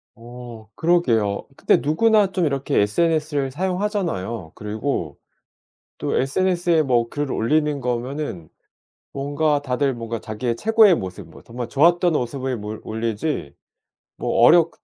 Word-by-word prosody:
어 120 Hz, -1 st, -11 dB
그러게요. 115 Hz, -13 st, +1 dB
근데 -, -, +3 dB
누구나 205 Hz, +6 st, +3 dB
좀 185 Hz, -3 st, 0 dB
이렇게 140 Hz, -2 st, 0 dB
SNS를 150 Hz, +4 st, 0 dB
사용하잖아요. 175 Hz, -, -2 dB
그리고 105 Hz, -, -3 dB, 0.8 s
또 -, -, -1 dB
SNS에 175 Hz, +3 st, +1 dB
뭐 120 Hz, -4 st, +1 dB
글을 145 Hz, +2 st, -3 dB
올리는 150 Hz, +4 st, +1 dB
거면은 125 Hz, -, -4 dB, 0.6 s
뭔가 145 Hz, +1 st, 0 dB
다들 135 Hz, 0 st, 0 dB
뭔가 115 Hz, 0 st, -5 dB
자기의 115 Hz, +2 st, -3 dB
최고의 220 Hz, -, +5 dB
모습 95 Hz, -7 st, -7 dB
뭐 -, -, -15 dB
정말 120 Hz, 0 st, -6 dB
좋았던 170 Hz, +6 st, +3 dB
모습을 130 Hz, -1 st, -2 dB
몰 105 Hz, 0 st, -7 dB
올리지 110 Hz, -, -3 dB, 0.6 s
뭐 -, -, -1 dB
어렵 165 Hz, +5 st, +6 dB
135 Hz, 285 characters per minute, -22 LUFS, 115-165 Hz, 0.8 s, 어렵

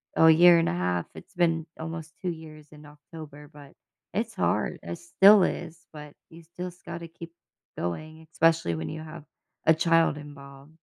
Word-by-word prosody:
a 160 Hz, -, +6 dB
year 170 Hz, +1 st, +7 dB
and 165 Hz, -, +1 dB
1/2, 90 Hz, 0 st, -1 dB
it's -, -, -13 dB
been 165 Hz, -3 st, +1 dB
almost 160 Hz, -1 st, -7 dB
2 185 Hz, -, -2 dB
years 155 Hz, -2 st, -9 dB
in 150 Hz, 0 st, -14 dB
October, 150 Hz, 0 st, -12 dB
but 145 Hz, -2 st, -15 dB, 0.4 s
it's -, -, -3 dB
hard, -, -, -1 dB
it 85 Hz, 0 st, -6 dB
still 195 Hz, -, +6 dB
is, 170 Hz, -1 st, -4 dB
but 150 Hz, -1 st, -11 dB, 0.2 s
you 165 Hz, 0 st, -14 dB
still 175 Hz, +2 st, -7 dB
sc 180 Hz, 0 st, -20 dB
gotta 170 Hz, -1 st, -7 dB
keep 165 Hz, 0 st, -12 dB, 0.4 s
going, 155 Hz, -, -6 dB
especially 165 Hz, -, +2 dB
when 80 Hz, 0 st, -5 dB
you 155 Hz, -, -6 dB
have 155 Hz, 0 st, -10 dB, 0.4 s
a 160 Hz, -, +6 dB
child 165 Hz, 0 st, +2 dB
involved. 140 Hz, 0 st, -13 dB
160 Hz, 170 wpm, -26 LUFS, 145-165 Hz, 0.4 s, year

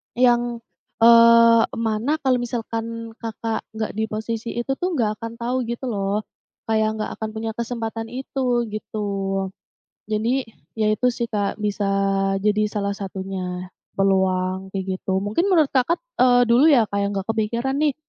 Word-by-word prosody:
yang, 240 Hz, -1 st, +2 dB, 0.4 s
eee, 230 Hz, 0 st, +7 dB
mana 225 Hz, +6 st, 0 dB
kalau 255 Hz, -2 st, +3 dB
misalkan 230 Hz, -1 st, -4 dB
Kakak 225 Hz, 0 st, -4 dB
nggak 220 Hz, -1 st, -2 dB
di 220 Hz, -, +1 dB
posisi 220 Hz, +1 st, -4 dB
itu 240 Hz, +2 st, -3 dB
tuh, 365 Hz, +1 st, -1 dB
nggak 215 Hz, -4 st, 0 dB
akan 230 Hz, 0 st, -5 dB
tahu 250 Hz, +1 st, -1 dB
gitu 235 Hz, +2 st, -4 dB
loh. 200 Hz, 0 st, -1 dB, 0.5 s
Kayak 220 Hz, 0 st, +1 dB
nggak -, -, -4 dB
akan 220 Hz, -, -3 dB
punya 225 Hz, 0 st, -3 dB
kesempatan 230 Hz, -1 st, -4 dB
itu, 250 Hz, -2 st, -1 dB
gitu. 210 Hz, -1 st, -4 dB, 1.0 s
Jadi, 235 Hz, +4 st, 0 dB, 0.3 s
ya 215 Hz, -, +3 dB
itu 250 Hz, -, +1 dB
sih 235 Hz, -1 st, -2 dB
Kak. 205 Hz, -1 st, -2 dB
Bisa 205 Hz, 0 st, -1 dB, 0.6 s
jadi 210 Hz, +1 st, +2 dB
salah 200 Hz, -1 st, -1 dB
satunya. 190 Hz, -2 st, -5 dB, 0.3 s
Peluang, 190 Hz, -1 st, +1 dB
kayak 190 Hz, -1 st, -3 dB, 0.2 s
gitu. 190 Hz, 0 st, 0 dB
Mungkin 280 Hz, -, 0 dB
menurut 315 Hz, -6 st, +4 dB
kakat, 270 Hz, +6 st, +2 dB, 0.2 s
eee, 245 Hz, -1 st, +6 dB
dulu 245 Hz, +7 st, +5 dB
ya 250 Hz, -7 st, +5 dB
Kak 200 Hz, -, -1 dB
yang 200 Hz, 0 st, 0 dB
nggak 195 Hz, -, -4 dB
kepikiran 235 Hz, +5 st, -1 dB
nih, 295 Hz, -3 st, +3 dB
225 Hz, 155 wpm, -22 LUFS, 210-240 Hz, 1.0 s, eee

